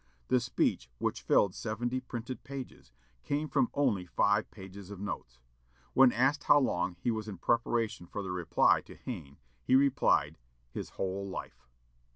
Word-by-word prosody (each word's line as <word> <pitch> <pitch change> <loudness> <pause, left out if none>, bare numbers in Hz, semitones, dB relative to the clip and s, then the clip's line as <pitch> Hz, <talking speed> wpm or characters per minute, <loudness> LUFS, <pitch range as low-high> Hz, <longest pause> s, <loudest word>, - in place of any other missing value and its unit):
The 125 - +4
speech, 60 - 0
which - - -2
filled 100 -3 +3
seventy 120 +3 -2
printed 125 0 -6
pages, 135 - -8 0.3
came 150 +2 -1
from 235 - +2
only 115 -11 +1
five 100 +4 +2
pages 95 -1 -11
of 100 -2 -8
notes. 70 -11 -6 0.5
When 130 -1 +7
asked 135 +5 +1
how 145 - +7
long 90 -8 0
he 120 - 0
was 110 -1 -3
in 100 -3 -6
preparation 115 -1 0
for 100 - -5
the 95 - -4
reply 90 -2 +3
to - - -13
Hayne, 80 - -7 0.3
he 130 - +3
answered, 130 - +3 0.3
his - - -5
"whole 95 +1 -2
life." 95 - -8
110 Hz, 160 wpm, -31 LUFS, 95-130 Hz, 0.5 s, When